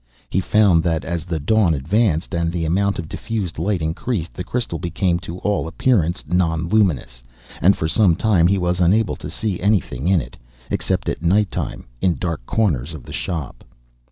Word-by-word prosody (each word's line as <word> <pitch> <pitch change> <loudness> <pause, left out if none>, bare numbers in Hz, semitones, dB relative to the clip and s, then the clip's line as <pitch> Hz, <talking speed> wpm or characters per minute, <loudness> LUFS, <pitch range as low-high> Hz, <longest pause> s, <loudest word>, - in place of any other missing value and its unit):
He - - +2
found 100 -4 +4
that 80 -1 -1
as 85 -1 -3
the 85 -3 -2
dawn 90 +1 +3
advanced, 85 - 0
and 85 -1 0
the 85 -1 -2
amount 100 +4 +1
of 85 - -5
diffused 100 -4 -4
light 90 0 0
increased, 85 +3 -2
the 90 - -5
crystal 105 -5 -3
became 85 0 0
to 85 0 -7
all 100 -5 +1
appearance 85 -3 +1
non 85 -2 +1
luminous. 85 - +1 0.4
And 95 +3 +5
for 80 - -1
some 90 0 +4
time 95 -4 +3
he 100 +2 +2
was 90 -1 0
unable 100 +4 +3
to - - -7
see 105 -5 -3
anything 90 - 0
in 95 -2 +4
it, - - -8 0.3
except - - -1
at - - -2
night 100 +5 +2
time, - - -4 0.2
in 90 -3 +2
dark 85 -7 -3
corners 80 - 0
of 70 - -10
the - - -10
shop. 80 -9 -4
85 Hz, 185 wpm, -21 LUFS, 80-100 Hz, 0.4 s, And